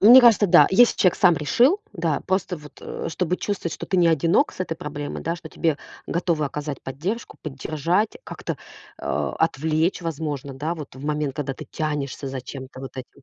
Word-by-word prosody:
Мне 245 +5 +10
кажется, 230 -4 +6
да. 170 - +7
Если 235 +5 +6
человек 185 - +4
сам 180 -4 +6
решил, 245 - +3
да. 165 -4 0
Просто 190 -1 0
вот, 150 -1 -13
э, - - -5
чтобы 180 +2 -1
чувствовать, 195 -5 -2
что - - -7
ты 190 - 0
не 175 -2 +5
одинок 165 - +3
с - - -13
этой 165 -3 -2
проблемой, 145 -3 -5
да, 165 +1 -1
что 170 - -10
тебе 160 -3 0 0.3
готовы 170 -3 0
оказать 145 0 -4
поддержку, 170 - -4
поддержать, 155 +8 -1
как-то, - - -5 0.4
э, - - -8 0.3
отвлечь, 160 +3 +1
возможно, 150 -4 -3
да, 155 +6 -2
вот 150 -6 -9
в 130 - -10
момент, 150 -2 -1
когда 140 -2 -2
ты - - -9
тянешься 145 -3 -3
за 135 -1 -4
чем-то 130 0 -8
вот 135 0 -8
этим 130 +2 -9
160 Hz, 190 wpm, -24 LUFS, 145-180 Hz, 0.4 s, Мне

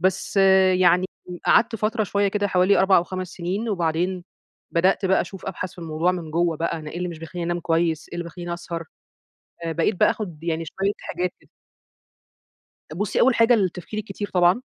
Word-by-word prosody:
بس 190 +2 0 0.4
يعني 180 +1 +4 0.4
قعدْت 230 -1 +4
فترة 215 +1 0
شوية 200 +1 +1
كده 205 0 0
حوالي 185 +2 +3
4 190 0 +5
أو 175 - +3
5 185 0 -5
سنين، 190 +7 -3
وبعدين 175 -1 -1 0.5
بدأت 185 +4 +2
بقى 190 - +3
أشوف 195 -1 -7
أبحث 185 -1 -4
في - - -20
الموضوع 165 +2 0
من 170 -4 -5
جوّه 170 0 +1
بقى، 165 0 -2
أنا 155 -1 -8
إيه - - -8
اللي 180 0 -2
مش 165 -2 -7
بيخلّيني 170 +1 -6
أنام 175 0 -1
كويس 165 -1 0
إيه - - -10
اللي 175 0 -3
بيخلّيني 175 0 -6
أسهر. 170 -1 -6 0.8
آآ 165 - -1
بقيت 165 +5 +1
بقى - - +6
آخد 170 -7 -5
يعني 165 -1 -2
شوية 195 +5 -1 0.2
حاجات 180 0 -1
كده. - - -26 1.4
بُصّي، 200 +4 -1
أول 260 -1 +5
حاجة 230 +2 +5
التفكير 190 -1 -1
الكتير 205 -1 -5
طبعًا. 180 +6 +4
180 Hz, 185 wpm, -23 LUFS, 170-195 Hz, 1.4 s, بقى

